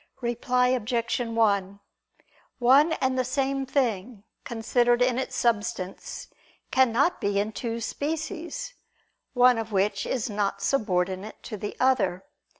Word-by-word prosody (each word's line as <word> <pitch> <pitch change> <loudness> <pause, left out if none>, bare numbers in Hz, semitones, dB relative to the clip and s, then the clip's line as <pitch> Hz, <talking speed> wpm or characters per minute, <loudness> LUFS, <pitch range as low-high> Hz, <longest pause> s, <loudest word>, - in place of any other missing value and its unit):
Reply 250 +1 +1
Obj. 240 -1 0
1: 205 -5 +1 0.8
One 275 +6 +5
and 260 -3 0
the - - +2
same 270 +1 -1
thing, 235 -5 -1 0.2
considered 240 +1 +1
in 250 0 +2
its 265 - -4
substance, 210 -4 -2 0.4
cannot 260 +5 +3
be 200 0 0
in 210 +2 -1
two 230 +1 -4
species, 325 - -4 0.6
one 245 -1 +5
of 225 0 -5
which 200 0 0
is 250 -4 -1
not 205 -2 -1
subordinate 195 -3 -1
to - - -6
the 205 0 -6
other. 205 -9 +2
235 Hz, 125 wpm, -26 LUFS, 205-260 Hz, 0.8 s, One